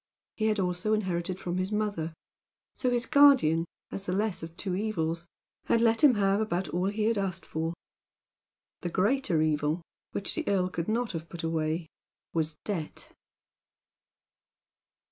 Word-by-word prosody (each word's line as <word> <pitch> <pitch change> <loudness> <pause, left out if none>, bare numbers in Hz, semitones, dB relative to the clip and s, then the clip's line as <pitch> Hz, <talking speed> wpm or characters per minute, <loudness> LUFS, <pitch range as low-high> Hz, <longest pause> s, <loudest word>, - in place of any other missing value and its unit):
He 220 - -1
had 215 -1 +1
also 180 +3 0
inherited 185 -2 -2
from 180 0 -2
his 185 +2 -1
mother, 205 -7 -1 0.6
so 255 - 0
his 245 0 +1
guardian, 260 - +6 0.3
as 195 - -4
the 180 - -1
less 205 0 0
of 165 +1 -8
two 190 -2 -2
evils, 170 -5 -1 0.4
had 230 - +3
let 230 +4 +3
him 275 -5 +8
have 200 0 +2
about 190 -4 -1
all 180 +2 0
he 210 +1 -1
had 220 -1 +2
asked 185 -2 -2
for. 160 +1 -3 1.0
The 175 - -3
greater 195 - +2
evil, 155 +2 0 0.3
which 195 - -2
the - - -3
earl 185 -2 +2
could 170 -2 -3
not 230 +2 0
have 165 -1 -6
put 170 -1 -7
away, 160 0 0 0.5
was 160 -1 0
debt. 175 -7 -4
185 Hz, 155 wpm, -29 LUFS, 165-215 Hz, 1.0 s, him